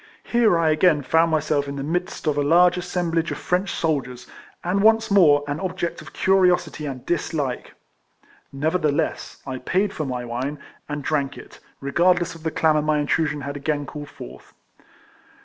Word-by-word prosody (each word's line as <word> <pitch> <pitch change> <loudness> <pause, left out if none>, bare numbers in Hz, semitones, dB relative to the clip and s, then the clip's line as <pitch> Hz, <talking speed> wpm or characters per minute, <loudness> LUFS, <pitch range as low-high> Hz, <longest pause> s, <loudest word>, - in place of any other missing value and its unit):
Here 230 -7 +3
I 165 -2 +2
again 155 -1 +3
found 160 +5 +3
myself 150 -2 0
in 140 - -5
the 140 - -4
midst 175 +5 -3
of 150 -2 +1
a 145 - +1
large 175 +4 +5
assemblage 175 -2 -1
of - - -3
French 180 +2 -1
soldiers, 130 -6 -2 0.4
and 185 +3 0
once 225 0 +4
more 150 -8 +5
an 145 +2 -3
object 185 -2 -3
of - - -12
curiosity 180 -5 +2
and 130 -3 -7
dis 175 -1 -2
like. 135 -5 -3 0.8
Nevertheless, 155 +1 -1
I 130 -1 -5
paid 190 +9 0
for 155 - -3
my 125 -2 -4
wine, 130 +5 -3 0.3
and 145 -1 -4
drank 140 -1 -1
it, - - -13 0.2
regardless 175 +5 +2
of 165 - -13
the 160 - -1
clamour 155 -1 +2
my 155 0 +1
in 145 - 0
trusion 150 -1 0
had 140 +1 -5
again 145 0 -2
called 145 0 -8
forth. 60 +2 -12
155 Hz, 175 wpm, -23 LUFS, 145-175 Hz, 0.8 s, large